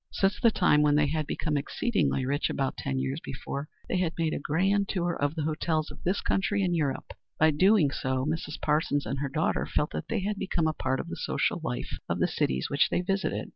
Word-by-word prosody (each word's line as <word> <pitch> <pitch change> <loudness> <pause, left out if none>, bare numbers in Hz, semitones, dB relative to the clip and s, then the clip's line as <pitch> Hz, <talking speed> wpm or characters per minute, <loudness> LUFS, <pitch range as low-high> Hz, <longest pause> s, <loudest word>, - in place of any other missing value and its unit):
Since 195 0 +1
the 235 - +5
time 175 -8 +3
when 150 -1 +4
they 150 0 +4
had 155 +1 -1
become 150 -2 -1
exceedingly 140 - 0
rich, 140 +3 0
about 135 -1 -1
ten 65 - -3
years 65 0 -1
before, 140 +3 -5 0.2
they - - 0
had 170 -3 -1
made 165 -2 0
a - - -2
grand 195 +7 +1
tour 175 -2 0
of 145 +2 -1
the 155 - -2
hotels 155 0 -1
of - - -12
this 185 +3 0
country 200 +1 +1
and 175 -2 +1
Europe. 145 -5 -2 0.2
By 155 0 +5
so 145 - -6
doing 190 -4 +5
Mrs. 145 +4 -2
Parsons 150 -1 +1
and 135 +5 -3
her 140 0 -2
daughter 155 +4 0
felt 150 - 0
that - - -5
they 220 -4 -1
became 185 -4 -1
a 155 - +2
part 130 -3 -1
of - - -4
the - - -5
social - - -1
life - - -4
of - - 0
the - - +2
cities 65 0 0
which 140 - +2
they - - +1
visited. 195 +1 -1
155 Hz, 225 wpm, -28 LUFS, 140-180 Hz, 0.2 s, the